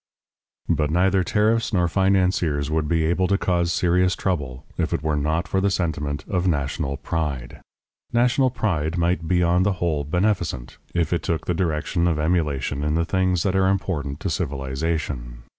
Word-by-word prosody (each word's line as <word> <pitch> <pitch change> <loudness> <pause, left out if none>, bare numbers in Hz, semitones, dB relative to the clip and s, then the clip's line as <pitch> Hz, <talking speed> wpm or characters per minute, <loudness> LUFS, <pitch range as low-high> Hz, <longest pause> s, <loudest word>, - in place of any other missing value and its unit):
But 75 -1 +1
neither 95 +3 +3
tariffs 110 +6 +1
nor 90 -3 +3
financiers 90 -5 +1
would 80 -1 0
be 80 0 +1
able 85 +3 +1
to 100 - +2
cause 85 -2 +1
serious 90 +1 +2
trouble, 70 -9 -3
if - - -1
it - - -4
were 80 -1 +1
not 80 +3 0
for 95 - 0
the 100 - +2
sentiment 75 -6 -2
of 90 -1 0
national 70 -2 -1
pride. 70 -7 -4 0.5
National 125 +2 +3
pride 85 - -1
might 85 -1 0
be 90 +1 +2
on 85 +1 +3
the 100 +1 +2
whole 85 -5 -1
beneficent, 90 - -1 0.2
if 85 -1 +1
it 85 - 0
took 80 -2 -2
the 90 - 0
direction 85 0 0
of 85 -3 +1
emulation 75 -4 0
in 75 +1 0
the 85 0 +1
things 95 -1 +1
that 95 -1 0
are 95 0 +3
important 80 -7 -1
to - - -2
civilization. 65 -3 -3
85 Hz, 175 wpm, -23 LUFS, 75-95 Hz, 0.5 s, neither